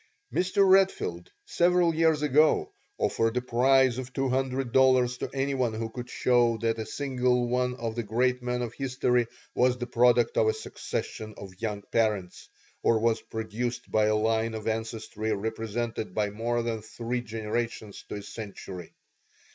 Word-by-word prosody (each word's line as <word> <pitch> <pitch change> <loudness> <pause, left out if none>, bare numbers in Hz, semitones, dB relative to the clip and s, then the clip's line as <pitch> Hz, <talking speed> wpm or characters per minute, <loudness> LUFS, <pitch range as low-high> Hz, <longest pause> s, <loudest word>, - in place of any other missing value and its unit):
Mr. 185 +2 +3
Redfield 185 - +2 0.2
several 175 -1 +3
years 160 -2 +2
ago 150 +2 +3 0.2
offered 115 +1 +1
a - - +2
prize 130 +1 +3
of 130 -1 -6
two 135 +1 -1
hundred 130 -1 -1
dollars 130 -1 +4
to - - -3
anyone 135 -4 0
who 115 0 -4
could 125 +1 -7
show 120 -2 +2
that 115 0 -1
a 110 - -4
single 125 -2 0
one 125 +1 0
of 115 -3 -4
the 120 - -1
great 125 +3 0
men 125 0 -2
of 120 -1 -5
history 125 -3 0 0.3
was 125 0 +3
the 120 - -3
product 120 -1 +3
of 110 - +4
a 110 - +3
succession 110 0 -5
of 95 -2 -9
young 105 -3 -3
parents, 105 -6 -1 0.3
or 115 - +3
was 115 0 +1
produced 110 +2 -4
by 110 0 +3
a 110 0 +2
line 110 +1 +1
of 110 0 -6
ancestry 110 -1 -3
represented 110 0 -3
by 105 -1 0
more 120 +3 -1
than 115 -2 -2
three 120 +3 -4
generations 110 -1 -4
to - - -4
a 100 - -6
century. 100 -5 -8
120 Hz, 165 wpm, -28 LUFS, 110-125 Hz, 0.3 s, dollars